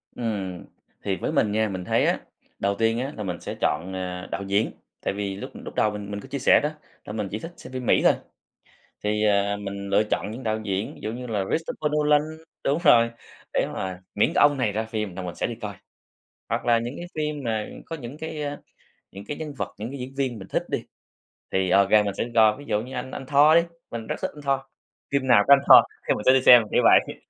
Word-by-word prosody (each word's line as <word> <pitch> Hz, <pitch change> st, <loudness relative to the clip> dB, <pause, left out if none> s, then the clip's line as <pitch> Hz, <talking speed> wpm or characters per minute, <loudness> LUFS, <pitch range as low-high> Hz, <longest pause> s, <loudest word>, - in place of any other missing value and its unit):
Ừm, 100 Hz, -6 st, -4 dB, 0.4 s
thì -, -, 0 dB
với -, -, -2 dB
mình 105 Hz, -, +2 dB
nha, 110 Hz, 0 st, +1 dB
mình 95 Hz, -2 st, -5 dB
thấy -, -, +2 dB
á, -, -, +1 dB, 0.4 s
đầu 100 Hz, 0 st, 0 dB
tiên 115 Hz, +1 st, +2 dB
á, 135 Hz, +3 st, -3 dB
là 105 Hz, -, -4 dB
mình 90 Hz, -2 st, -4 dB
sẽ -, -, -5 dB
chọn, 85 Hz, +5 st, 0 dB
à, 90 Hz, -1 st, -5 dB
đạo 100 Hz, -, -3 dB
diễn, 100 Hz, +2 st, +1 dB, 0.3 s
tại -, -, -1 dB
vì 100 Hz, -1 st, -3 dB
lúc 100 Hz, -, -7 dB
lúc -, -, -9 dB
đầu 105 Hz, -, +2 dB
mình 105 Hz, -1 st, -7 dB
mình 100 Hz, -, -4 dB
có 120 Hz, -, -11 dB
chia 140 Hz, +1 st, -4 dB
sẻ 130 Hz, -, +6 dB
đó, 150 Hz, -, +1 dB, 0.4 s
là 105 Hz, -, -6 dB
mình 105 Hz, -2 st, -2 dB
chỉ 105 Hz, -, -3 dB
thích 165 Hz, +6 st, -8 dB
xem 130 Hz, -, -11 dB
phim 130 Hz, -1 st, -4 dB
Mỹ -, -, +4 dB
thôi, -, -, +6 dB, 0.9 s
thì, 105 Hz, +1 st, +1 dB
ờ, 100 Hz, 0 st, +2 dB
mình 100 Hz, -1 st, -6 dB
lựa -, -, +4 dB
chọn 105 Hz, -, -1 dB
những 120 Hz, +4 st, -7 dB
đạo 110 Hz, -1 st, -1 dB
diễn, 100 Hz, 0 st, -2 dB
ví -, -, -15 dB
dụ 110 Hz, +1 st, -3 dB
như 125 Hz, +1 st, -6 dB
là 105 Hz, -4 st, -1 dB
Christopher 155 Hz, -2 st, -2 dB
Nolan 150 Hz, -1 st, +4 dB, 0.4 s
đúng 140 Hz, +3 st, +2 dB
rồi, 115 Hz, -4 st, +6 dB, 0.4 s
để -, -, +1 dB
mà 95 Hz, -1 st, -4 dB
miễn 105 Hz, -, +2 dB
cái -, -, +4 dB
ông 145 Hz, -1 st, +5 dB
này 115 Hz, -5 st, +1 dB
ra 110 Hz, +2 st, -1 dB
phim 105 Hz, -4 st, -4 dB
là 95 Hz, -, -4 dB
mình 90 Hz, -3 st, -5 dB
sẽ -, -, -1 dB
đi -, -, -4 dB
coi. -, -, -5 dB, 0.7 s
Hoặc -, -, -1 dB
là 120 Hz, -1 st, +4 dB
những 120 Hz, +3 st, -4 dB
cái 175 Hz, -, -7 dB
phim 150 Hz, -2 st, -2 dB
mà 110 Hz, -2 st, -1 dB, 0.2 s
có 165 Hz, -, -5 dB
những 135 Hz, +2 st, -9 dB
cái, 160 Hz, -1 st, -5 dB
a, 145 Hz, 0 st, -4 dB, 0.5 s
những 100 Hz, +1 st, -10 dB
cái 145 Hz, -, -5 dB
nhân 155 Hz, -2 st, -6 dB
vật, -, -, -4 dB
những 110 Hz, +3 st, -5 dB
cái 140 Hz, -, -7 dB
diễn 130 Hz, +2 st, -6 dB
viên 130 Hz, -5 st, -1 dB
mình 95 Hz, -, -10 dB
thích -, -, -1 dB
đi, -, -, -2 dB, 0.7 s
thì 95 Hz, -1 st, +1 dB
OK 100 Hz, +1 st, +4 dB
mình 105 Hz, -2 st, +4 dB
sẽ -, -, 0 dB
đi 120 Hz, -, -7 dB
coi, 110 Hz, +1 st, +5 dB
ví 145 Hz, -, -11 dB
dụ 105 Hz, 0 st, +1 dB
như 130 Hz, +3 st, -9 dB
anh 130 Hz, +1 st, -5 dB
anh 135 Hz, -, -6 dB
Thor 145 Hz, +3 st, +5 dB
đi, 170 Hz, -, +7 dB, 0.3 s
mình 115 Hz, -1 st, -5 dB
rất -, -, -2 dB
thích -, -, -2 dB
anh 150 Hz, -, -10 dB
Thor, 140 Hz, -1 st, +1 dB, 0.5 s
phim 140 Hz, -1 st, 0 dB
nào 120 Hz, -5 st, +6 dB
có 140 Hz, -, +9 dB
anh 140 Hz, -, +7 dB
Thor -, -, +11 dB, 0.3 s
thì -, -, +4 dB
mình 105 Hz, -, -4 dB
sẽ -, -, +7 dB
đi 130 Hz, -, +4 dB
xem, 125 Hz, -2 st, +8 dB
kiểu -, -, +3 dB
vậy. -, -, +5 dB
110 Hz, 255 wpm, -25 LUFS, 100-135 Hz, 0.9 s, Thor